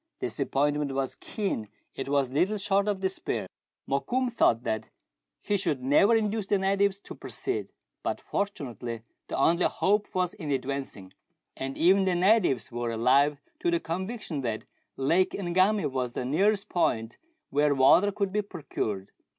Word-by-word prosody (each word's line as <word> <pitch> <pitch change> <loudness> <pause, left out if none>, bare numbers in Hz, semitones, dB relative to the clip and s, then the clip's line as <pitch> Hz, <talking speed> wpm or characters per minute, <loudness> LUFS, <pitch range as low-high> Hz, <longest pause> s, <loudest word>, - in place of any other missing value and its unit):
Disappointment 145 0 0
was 135 0 -1
keen, 190 - -3 0.2
it 135 - -5
was 140 -3 +1
little 185 +10 +1
short 200 0 +1
of 200 -2 -1
despair. 190 0 -2 0.4
Mokoum 245 - 0
thought 120 - +3
that 110 0 -2 0.5
he 205 - 0
should 145 -9 -1
never 175 - +5
induce 215 -2 0
the 205 - +3
natives 195 +1 +1
to - - -9
proceed; 400 +1 -4 0.3
but - - -2
fortunately 120 - -4 0.2
the - - -3
only 170 +5 +3
hope 205 +2 +2
was 180 0 +1
in 175 -8 -7
advancing, 135 -8 -3 0.4
and 135 0 -5
even 190 +3 +5
the 185 -1 +2
natives 180 - +3
were 120 0 -2
alive 135 +6 +3 0.2
to - - +1
the 170 0 +2
conviction 185 - -4
that 115 -4 -3 0.3
Lake 165 +8 +2
Ngami 190 +2 +2
was 125 -2 -2
the 125 - -3
nearest 195 +9 +2
point 115 -10 0 0.3
where 145 0 +3
water 175 +10 +5
could 200 -1 -2
be 210 - +2
procured. 110 - -4
170 Hz, 150 wpm, -28 LUFS, 135-200 Hz, 0.5 s, never